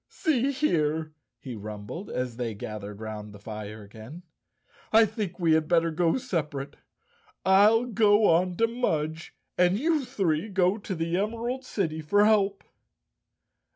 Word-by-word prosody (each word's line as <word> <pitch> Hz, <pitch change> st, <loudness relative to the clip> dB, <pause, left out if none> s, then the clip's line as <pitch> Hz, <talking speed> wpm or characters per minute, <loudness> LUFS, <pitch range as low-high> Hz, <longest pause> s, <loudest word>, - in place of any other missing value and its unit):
"See 275 Hz, -4 st, 0 dB
here," 160 Hz, -, 0 dB, 0.2 s
he 125 Hz, 0 st, -8 dB
rumbled, 105 Hz, -, -7 dB
as 125 Hz, -2 st, -3 dB
they 115 Hz, -3 st, -3 dB
gathered 105 Hz, 0 st, -7 dB
round 105 Hz, -1 st, -7 dB
the -, -, -11 dB
fire 105 Hz, 0 st, -8 dB
again, 110 Hz, -, -11 dB, 0.7 s
"I 225 Hz, +1 st, +7 dB
think 210 Hz, -4 st, -4 dB
we 170 Hz, -2 st, +2 dB
had 160 Hz, -1 st, +2 dB
better 165 Hz, -1 st, +2 dB, 0.2 s
separate. 150 Hz, -, -3 dB, 0.7 s
I'll 210 Hz, +5 st, +5 dB
go 215 Hz, -2 st, +3 dB
on 175 Hz, +1 st, +3 dB
to 230 Hz, -, +4 dB
Mudge 160 Hz, -9 st, -2 dB, 0.2 s
and 180 Hz, +2 st, +4 dB
you 310 Hz, +3 st, +1 dB
three 195 Hz, -, -1 dB
go 190 Hz, +1 st, +2 dB
to 200 Hz, -2 st, -5 dB
the 165 Hz, +1 st, -1 dB
Emerald 230 Hz, +6 st, -2 dB
City 160 Hz, -10 st, -2 dB
for 205 Hz, +7 st, +3 dB
help." 200 Hz, -2 st, +2 dB
175 Hz, 140 wpm, -27 LUFS, 135-215 Hz, 0.7 s, I